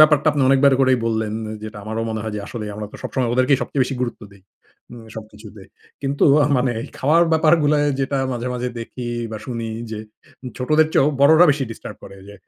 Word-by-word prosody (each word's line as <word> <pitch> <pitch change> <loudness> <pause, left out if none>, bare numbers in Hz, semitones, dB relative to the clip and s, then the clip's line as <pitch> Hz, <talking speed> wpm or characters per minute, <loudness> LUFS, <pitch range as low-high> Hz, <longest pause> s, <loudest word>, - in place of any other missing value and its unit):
ব্যাপারটা 155 0 +6
আপনি 145 -1 0
অনেকবার 135 +1 +5
করেই 130 -1 +4
বললেন 110 -1 -1 0.3
যেটা 110 0 -8
আমারও 110 +1 -3
মনে 110 -1 -3
হয় 110 -1 -4
যে - - -4
আসলেই 110 -3 -6
আমরা 105 0 -6
তো - - -9
সবসময় 125 -3 -1
ওদেরকেই 130 +2 +3
সবচেয়ে 135 - 0
বেশি 135 - -4
গুরুত্ব 120 -2 -3
দেই। 100 -1 -19 0.5
উম 120 -2 -11
সবকিছুতে। 110 -1 -11 0.4
কিন্তু 140 +1 +1 0.2
আ - - +3
মানে 125 0 +1 0.3
খাওয়ার 160 +5 +4
ব্যাপারগুলায় 155 -2 +3
যেটা 135 +1 -1
মাঝে, 120 0 -4
মাঝে 125 0 -2
দেখি 120 +1 -7 0.3
বা 110 - -4
শুনি, 115 -2 -4 0.2
যে 110 - -5 0.6
ছোটদের 155 +5 +3
চেয়েও 135 - +4
বড়রা 160 +4 +7
বেশি 140 -1 0
ডিস্টার্ব 115 - -9
করে, 100 - -12
যে 100 - -11
130 Hz, 190 wpm, -21 LUFS, 115-145 Hz, 0.6 s, বড়রা